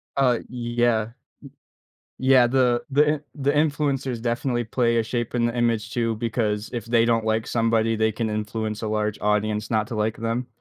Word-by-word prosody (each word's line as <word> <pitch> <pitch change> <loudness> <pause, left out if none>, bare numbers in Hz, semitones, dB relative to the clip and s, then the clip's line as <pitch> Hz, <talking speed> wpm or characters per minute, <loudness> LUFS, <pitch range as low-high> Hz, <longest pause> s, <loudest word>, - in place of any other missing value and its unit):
Uh, 125 -4 +3
yeah. 120 -2 0
Y 115 - -16 1.1
yeah. 130 -1 +5
The 125 -1 +2
the 145 +2 +4
in 150 - -6
the 140 -1 +1
influencers 140 -5 0
definitely 120 +1 -1
play 115 +1 +1
a 115 - +2
shape 120 +1 -3
in 120 -1 +2
the 120 - -1
image 115 -2 0
too 115 -2 0
because 110 -2 -2
if 120 -2 -4
they 115 0 +3
don't 115 -1 +1
like 110 0 0
somebody, 115 -1 +1
they 110 0 +1
can 110 +1 -2
influence 110 0 -3
a 110 - -3
large 105 -1 -1
audience 105 0 0
not 110 -1 +1
to 120 - -5
like 110 +1 -1
them. 115 +2 -2
115 Hz, 185 wpm, -24 LUFS, 110-120 Hz, 1.1 s, yeah